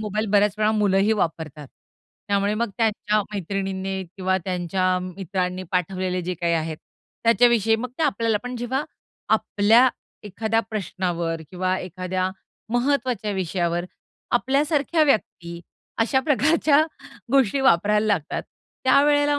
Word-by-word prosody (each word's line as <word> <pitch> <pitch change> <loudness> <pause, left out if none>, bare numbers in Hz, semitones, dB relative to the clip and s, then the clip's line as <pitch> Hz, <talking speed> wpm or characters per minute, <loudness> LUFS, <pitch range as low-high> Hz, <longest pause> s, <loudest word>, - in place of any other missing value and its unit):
Mobile 215 +1 -2
बऱ्याच 205 0 +3
वेळा 215 0 +3
मुलंही 205 0 +2
वापरतात. 160 -7 -3 0.6
त्यामुळे 200 +1 +1
मग 235 -1 0
त्यांच्या 215 -1 +1
मैत्रिणींनी 195 0 -3
किंवा 190 -1 +1
त्यांच्या 185 0 0
मित्रांनी 185 0 -3
पाठवलेले 185 0 -1
जे 180 +1 -3
काही 170 0 -1
आहेत, 160 -1 -2 0.5
त्याच्याविषयी 230 -1 +4
मग 250 +2 -5
ते - - 0
आपल्याला 230 -7 +1
पण 250 0 -5
जेव्हा 260 +4 -2 0.5
आपल्या 225 +5 +4 0.4
एखाद्या 220 +3 0
प्रश्नावर 175 -5 -2
किंवा 185 0 -1
एखाद्या 185 +1 -3 0.4
महत्त्वाच्या 245 -4 0
विषयावर 175 -2 -1 0.5
आपल्यासारख्या 290 +5 +1
व्यक्ती 170 - -1 0.4
अशा 265 +4 +2
प्रकारच्या 300 +1 +3 0.5
गोष्टी 270 -1 +3
वापरायला 210 -1 +3
लागतात, 180 -8 -1 0.4
त्यावेळेला 290 +2 +4
205 Hz, 115 wpm, -23 LUFS, 185-240 Hz, 0.6 s, त्याच्याविषयी